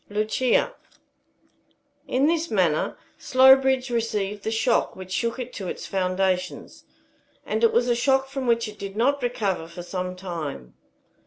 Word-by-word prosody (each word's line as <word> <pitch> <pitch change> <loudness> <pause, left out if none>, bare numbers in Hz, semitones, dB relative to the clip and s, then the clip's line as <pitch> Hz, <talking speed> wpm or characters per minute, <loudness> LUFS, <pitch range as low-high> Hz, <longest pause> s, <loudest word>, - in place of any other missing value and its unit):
LUCIA. 225 - +1 1.3
In 260 +3 +2
this 330 +1 +1
manner 180 -7 +1 0.2
Slowbridge 265 0 +5
received 210 -3 -2
the - - -1
shock 225 +2 +1
which 185 0 -10
shook 230 +5 -1
it 250 -1 -6
to 190 - -6
its - - -5
foundations, 185 -1 -2 0.6
and 220 +2 -2
it 230 - +6
was 240 +1 +2
a 240 - +3
shock 265 +2 +2
from 270 -1 -4
which 235 -1 +2
it 210 0 -10
did 195 0 -6
not 280 +5 +2
recover 205 -9 -1
for 170 +1 -9
some 180 0 -4
time. 160 - -6
220 Hz, 150 wpm, -24 LUFS, 185-255 Hz, 1.3 s, it